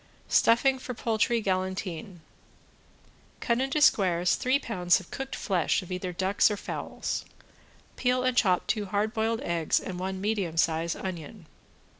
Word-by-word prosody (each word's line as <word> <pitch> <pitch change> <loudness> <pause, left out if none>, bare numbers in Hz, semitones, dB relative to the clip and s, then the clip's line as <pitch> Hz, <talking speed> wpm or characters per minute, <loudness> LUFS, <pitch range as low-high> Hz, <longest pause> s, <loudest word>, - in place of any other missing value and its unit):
~STUFFING 260 +3 +4
FOR 250 -1 -6
POULTRY 230 +1 +1
GALANTINE~ 185 -2 -3 1.2
Cut 235 +1 0
into 270 +3 0
squares 180 - +4
three 255 +2 +2
pounds 180 -10 +1
of 185 - -14
cooked 270 0 -5
flesh 185 -2 0
of 180 - -11
either 180 0 -3
ducks 190 +4 +2
or 210 - -2
fowls; - - -4 0.7
peel 250 0 +1
and 255 -1 +1
chop 185 -7 +3
two 210 -3 -1
hard 210 +3 -1
boiled 225 0 0
eggs 170 -2 +1
and 180 -1 -6
one 190 +1 -3
medium 195 -5 -2
size 165 0 +1
onion. 185 +1 -7
195 Hz, 145 wpm, -28 LUFS, 180-230 Hz, 1.2 s, ~STUFFING